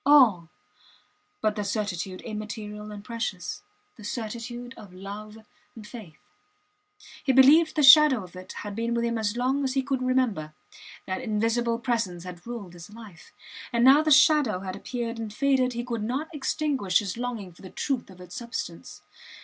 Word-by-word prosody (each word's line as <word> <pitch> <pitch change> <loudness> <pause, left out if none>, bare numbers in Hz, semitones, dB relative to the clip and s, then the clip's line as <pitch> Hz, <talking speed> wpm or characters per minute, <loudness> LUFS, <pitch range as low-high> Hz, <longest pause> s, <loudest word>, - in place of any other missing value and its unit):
All 245 - +5 0.9
but 215 -1 +1
the 210 - -2
certitude 200 -3 -3
immaterial 210 -1 -6
and 205 -1 -9
precious 210 -6 -4 0.4
the 215 - -12
certitude 240 +3 -5
of 200 -3 -12
love 205 +3 -8 0.4
and 220 -2 -10
faith. 210 -9 -11 1.1
He 270 - +2
believed 285 +5 +6
the 300 - +2
shadow 275 -4 +8
of 180 0 -13
it 185 0 -9
had 205 -1 -6
been 230 +1 -1
with 235 0 0
him 235 -1 -1
as 215 +1 -1
long 265 +3 +1
as 265 0 -1
he 270 - +1
could 270 -1 -2
remember; 245 -12 0 0.5
that 185 +3 -3
invisible 230 +1 0
presence 230 -8 -2
had 180 +2 -10
ruled 220 -7 -7
his 175 +1 -11
life. 215 -6 -13 0.4
And 235 +1 +3
now 275 +3 +8
the 310 - 0
shadow 290 -9 +5
had 185 -1 -5
appeared 235 -2 -5
and 220 -2 -5
faded 260 +1 +1
he 240 0 -3
could 235 -3 -3
not 275 +9 -3
extinguish 275 - 0
his 200 -4 -2
longing 235 -6 -4
for - - -19
the 190 - -10
truth 265 0 -3
of 185 -1 -14
its 180 -1 -12
substance. 235 0 -6
230 Hz, 175 wpm, -26 LUFS, 200-255 Hz, 1.1 s, shadow